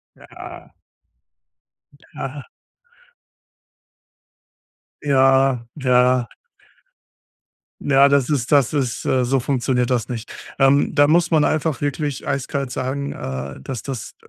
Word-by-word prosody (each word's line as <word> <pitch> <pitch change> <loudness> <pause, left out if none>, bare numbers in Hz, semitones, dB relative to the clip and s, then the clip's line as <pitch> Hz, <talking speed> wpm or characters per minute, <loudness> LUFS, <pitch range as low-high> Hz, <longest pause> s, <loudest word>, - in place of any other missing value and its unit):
Ja. - - -12 1.4
Ja. 135 0 -6 2.5
Ja. 135 -3 +3
Ja. 125 -2 +2 1.5
Ja, 140 0 +4
das 140 -2 +2
ist 135 -4 -1
das 140 -1 +3
ist 130 -5 -2
Äh, 130 -1 +2
so 135 +2 +1
funktioniert 125 -1 0
das 120 -1 0
nicht. 115 -2 -6 0.3
Ähm, 135 +1 +3
da 145 -1 +5
muss 170 +2 +3
man 155 -3 +3
einfach 155 -3 0
wirklich 145 -1 -3
eiskalt 135 -1 -2
sagen, 135 +2 -3
äh, 65 +1 -6
das 120 - -6
das 130 -4 -6
135 Hz, 105 wpm, -20 LUFS, 125-140 Hz, 2.5 s, da